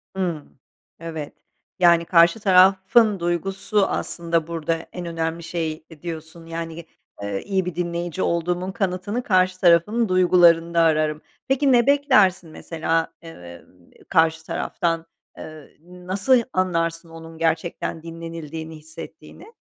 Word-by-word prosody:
Hıı. 170 -6 -2 0.6
Evet. 160 -3 -6 0.5
Yani, 170 -1 +5
karşı 170 +4 +4
tarafın 195 +2 +4
duygusu 190 +4 0
aslında 170 -2 -2
burada 165 0 -3
en 180 -1 -6
önemli 165 0 -3
şeydi 160 -2 -5
diyorsun, 165 0 -8
yani, 165 0 -6
ge 170 0 -9 0.4
ııı, 100 -1 -3
iyi 190 - -2
bir 180 - -5
dinleyici 175 0 -3
olduğumun 175 +2 -1
kanıtını 195 +3 -2
karşı 185 -3 +2
tarafın 190 +6 +3
duygularında 170 -2 +4
ararım. 155 -1 +1 0.3
Peki, 270 +1 +2
ne 240 -1 +4
beklersin 210 - +3
mesela, 165 0 -2
eee, 85 - -12 0.4
karşı 160 -2 +2
taraftan, 165 -1 -2 0.3
eee, 155 -2 -11
nasıl 185 +8 0
anlarsın 165 -2 -1
onun 165 0 -11
gerçekten 165 0 -2
dinlenildiğini 165 -1 -7
hissettiğini? 160 - -12
170 Hz, 115 wpm, -22 LUFS, 165-185 Hz, 0.6 s, Yani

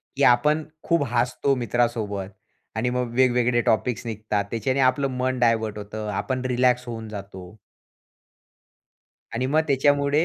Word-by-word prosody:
की - - 0
आपण 150 +7 +4 0.2
खूप 170 -3 +2
हसतो 125 +3 +1
मित्रासोबत 115 -5 -1 0.5
आणि 115 +2 0
मग 125 -1 -2
वेगवेगळे 125 -1 +3
टॉपिक्स 115 +3 0
निघतात. 110 -2 -2
त्याच्याने 130 +4 -1
आपलं 135 +2 +3
मन 130 0 -1
डायव्हर्ट 110 -3 +1
होतं, 105 +1 -6
आपण 130 +6 -2
रिलॅक्स 125 0 +2
होऊन 115 -1 -6
जातो. 100 -2 -9 1.8
आणि 125 +3 0
मग 150 +4 +3
त्याच्यामुळे 145 +2 +3
120 Hz, 130 wpm, -24 LUFS, 110-130 Hz, 1.8 s, आपण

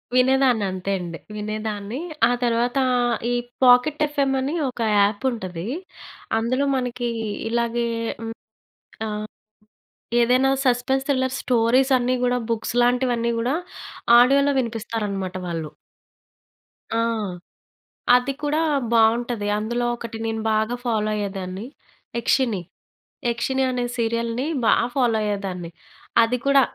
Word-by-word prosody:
వినేదాన్ని 255 -4 +4
అంతే 185 +1 -3
అండి. 170 -2 -6 0.2
వినేదాన్ని. 215 +2 -4 0.3
ఆ - - +2
తర్వాతా 240 +3 +1 0.5
ఈ - - +1 0.3
పాకెట్ 250 +4 +5
ఎఫ్ఎం 280 -2 0
అని 275 +4 -2 0.2
ఒక 245 -2 -7 0.2
యాప్ 205 +4 +2
ఉంటది. 185 -5 -5 0.7
అందులో 255 +5 0
మనకీ 245 -1 -2 0.4
ఇలాగే 235 0 0 0.4
హ్మ్. 225 0 -5 0.7
ఆ! - - -2 1.2
ఏదైనా 255 +3 +3 0.2
సస్పెన్స్ 265 +2 +1
థ్రిల్లర్స్ 260 -2 0
స్టోరీసన్నీ 250 +1 +3
గూడా, 250 0 +2
బుక్స్‌ 230 0 -2
లాంటివన్నీ 245 -1 +1
గూడా 245 +5 0 0.7
ఆడియో‌లో 280 +3 +4
వినిపిస్తారనమాట 210 -5 -3
వాళ్ళు. 165 -3 -3 1.2
ఆ! 230 0 +1 1.1
అది 250 +2 +1
కూడా 300 +2 +1 0.3
బావుంటది. 230 -1 +2
అందులో 240 +3 -1
ఒకటి 235 -1 -7
నేను 225 0 -2
బాగా 220 +3 +1
ఫాలో 215 -2 0
అయ్యేదాన్ని. 195 0 -4 0.5
'యక్షిని, 235 -4 +1 0.7
యక్షిని' 265 +3 0
అనే 245 -1 -1
సీరియల్‌ని 230 +3 -1 0.2
బా - - +6 0.2
ఫాలో 240 -4 +2
అయ్యేదాన్ని. 190 -4 -3 0.5
అది 245 +2 +1
కూడా 275 0 +6
235 Hz, 110 wpm, -23 LUFS, 215-255 Hz, 1.2 s, బా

